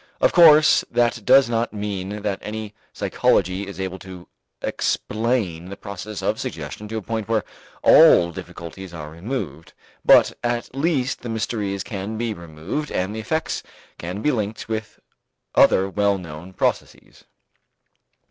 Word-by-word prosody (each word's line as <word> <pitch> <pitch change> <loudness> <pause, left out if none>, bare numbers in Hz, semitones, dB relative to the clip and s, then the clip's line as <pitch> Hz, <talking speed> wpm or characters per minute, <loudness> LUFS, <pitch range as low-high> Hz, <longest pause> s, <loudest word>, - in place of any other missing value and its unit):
Of - - +3
course, 155 -3 +7
that 120 0 +1
does 135 -2 +6
not 115 -1 -1
mean 105 0 -4
that 100 -2 -1
any 110 0 -6 0.2
psychology 95 +2 +1
is 100 -2 -8
able 95 0 -4
to 90 -2 -11 0.4
explain 110 -7 -1
the 100 - -8
process 100 +1 -7
of - - 0
suggestion 105 - -6
to 110 +1 -4
a 110 - -5
point 110 -1 -3
where 115 -2 +1 0.4
all 85 0 +7
difficulties 85 +2 -9
are 75 -2 -7
removed, 85 - -5 0.3
but - - +6
at 120 0 -2
least 140 -2 0
the 120 - -6
mysteries 105 -3 -2
can 105 +1 -5
be 115 -1 -1
removed 85 - -5
and 95 +4 -2
the - - -4
effects 160 +9 -2 0.4
can 90 +5 -5
be 150 - +3
linked 110 -4 -3
with 110 -1 -5 0.5
other 95 - +5
well 100 0 +1
known 85 +1 -9
processes. - - -3
105 Hz, 145 wpm, -22 LUFS, 95-115 Hz, 0.5 s, course